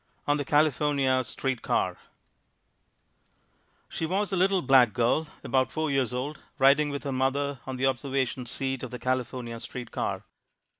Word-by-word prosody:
On 145 0 +2
the 145 - -3
California 145 -3 +2
Street 130 +1 -3
Car - - 0 1.9
She 160 - -3
was 195 +3 -1
a - - +3
little 190 0 +2
black 125 -5 +5
girl 120 +8 +1 0.2
about 130 -1 +1
four 155 -1 -1
years 135 -4 +1
old, 130 +5 -4 0.2
riding 140 +2 +5
with 140 -1 -4
her 140 - -3
mother 135 +1 0
on 130 - -3
the 130 +1 0
observation 130 -1 -1
seat 135 +1 -2
of 130 - -5
the 125 - -6
California 125 -2 -3
street 125 +1 -7
car. - - -2
135 Hz, 155 wpm, -27 LUFS, 130-145 Hz, 1.9 s, black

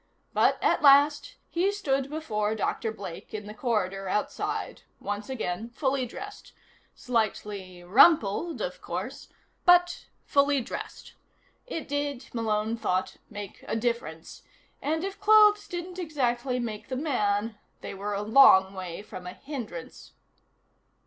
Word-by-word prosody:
But, - - +3
at - - +3
last, 290 - +5 0.2
he 365 +4 +2
stood 275 -9 -1
before 220 -9 -2
Dr. 220 +1 -1
Blake 195 -3 -8
in 210 -1 -5
the 210 - -8
corridor 195 -5 -1
outside, 210 - -2 0.2
once 205 +2 -4
again 225 -3 -3
fully 265 +1 -1
dressed. 410 - -10 0.4
Slightly 205 -6 -2
rumpled, 265 - +4
of - - -5
course, - - -6 0.3
but 355 0 +4 0.2
fully 280 0 +3
dressed. 240 - -7 0.5
It 330 -10 -5
did, 285 -2 -3
Malone 220 -1 -1
thought, 185 -4 -1
make 205 -3 -8
a - - -1
difference, 225 -9 -3 0.4
and 320 +3 -1
if 390 +1 -5
clothes 420 0 +6
didn't 355 +1 -6
exactly 255 -6 -1
make 220 -3 -5
the 260 - -3
man 215 -7 0 0.2
they - - -6
were 200 +1 -4
a 200 - -2
long 210 -5 +7
way 185 0 -6
from 180 -3 -9
a 180 - -6
hindrance. 235 - -8
235 Hz, 130 wpm, -27 LUFS, 205-295 Hz, 0.5 s, long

